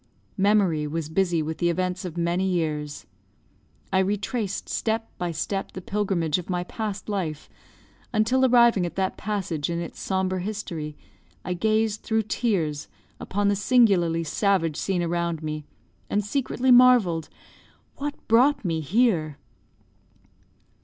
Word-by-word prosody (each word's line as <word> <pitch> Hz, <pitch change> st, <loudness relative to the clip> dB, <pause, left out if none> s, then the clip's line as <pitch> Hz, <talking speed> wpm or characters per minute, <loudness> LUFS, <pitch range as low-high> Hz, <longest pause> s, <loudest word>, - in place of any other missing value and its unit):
Memory 190 Hz, -7 st, +3 dB
was 155 Hz, 0 st, -3 dB
busy 175 Hz, -1 st, +1 dB
with 160 Hz, +1 st, -5 dB
the 175 Hz, -, +2 dB
events 185 Hz, +2 st, -2 dB
of 175 Hz, -1 st, -6 dB
many 175 Hz, +2 st, 0 dB
years. 150 Hz, -4 st, -2 dB, 0.9 s
I 190 Hz, -, +4 dB
retraced 200 Hz, +2 st, -1 dB
step 225 Hz, 0 st, -1 dB
by 175 Hz, -, -1 dB
step 195 Hz, +4 st, -3 dB
the -, -, -5 dB
pilgrimage 185 Hz, -5 st, 0 dB
of 180 Hz, -, -9 dB
my 180 Hz, -1 st, -1 dB
past 205 Hz, +1 st, -5 dB
life, 175 Hz, -8 st, -3 dB, 0.6 s
until 250 Hz, +3 st, +2 dB
arriving 235 Hz, -6 st, +5 dB
at -, -, -9 dB
that 190 Hz, -1 st, -1 dB
passage 185 Hz, -8 st, -3 dB
in 170 Hz, -, -1 dB
its 170 Hz, -, -7 dB
sombre 190 Hz, -1 st, -1 dB
history, 170 Hz, -7 st, -5 dB, 0.5 s
I 180 Hz, -, -1 dB
gazed 215 Hz, +3 st, +1 dB
through 220 Hz, 0 st, 0 dB
tears 175 Hz, -, -1 dB, 0.3 s
upon 205 Hz, +1 st, -1 dB
the 200 Hz, -, +3 dB
singularly 195 Hz, -7 st, +3 dB
savage 165 Hz, -2 st, +1 dB
scene 185 Hz, -3 st, -1 dB
around 170 Hz, -1 st, -1 dB
me, 155 Hz, -1 st, -4 dB, 0.4 s
and 205 Hz, -1 st, 0 dB
secretly 260 Hz, +2 st, 0 dB
marvelled, 245 Hz, -10 st, +5 dB, 0.7 s
"What 290 Hz, +1 st, -3 dB
brought 255 Hz, +3 st, +4 dB
me 165 Hz, -2 st, 0 dB
here?" 160 Hz, -, +1 dB
190 Hz, 135 wpm, -25 LUFS, 165-215 Hz, 0.9 s, arriving